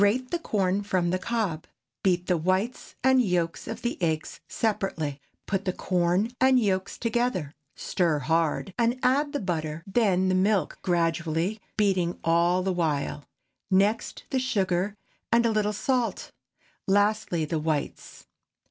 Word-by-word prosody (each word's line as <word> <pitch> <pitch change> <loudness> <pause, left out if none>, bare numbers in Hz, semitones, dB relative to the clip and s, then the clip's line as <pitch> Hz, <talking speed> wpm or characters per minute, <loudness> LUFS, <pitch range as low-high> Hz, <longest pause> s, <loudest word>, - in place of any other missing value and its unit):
Grate 245 +6 +2
the 345 - 0
corn 195 - 0
from 185 -4 0
the 185 - 0
cob; 200 -8 -2 0.3
beat 180 -2 +1
the 180 - +2
whites 185 +8 -1
and 260 0 +5
yolks 180 -6 -1
of 225 - -6
the 240 -5 -2
eggs 160 -2 -1
separately. 165 -10 -2 0.2
Put 195 0 -2
the 185 - 0
corn 180 +5 +1
and 260 0 +6
yolks 190 -4 -1
together, 230 - -1 0.2
stir 170 -4 0
hard, 165 +5 0
and 235 +2 +2
add 285 +3 +2
the 285 - -2
butter; 165 -4 -3
then 195 -3 +2
the 185 - +2
milk 190 -2 +1
gradually, 170 +3 0 0.2
beating 185 -5 +1
all 170 +2 +3
the 190 0 0
while; 150 -4 -1 0.4
next 200 +3 +1
the 265 - +1
sugar 200 -5 0 0.3
and 235 0 +4
a 230 - +3
little 210 -1 +1
salt; 245 +3 -1 0.6
lastly 205 -4 +2
the 155 +1 -2
whites. 155 -2 -3
190 Hz, 145 wpm, -27 LUFS, 170-220 Hz, 0.6 s, and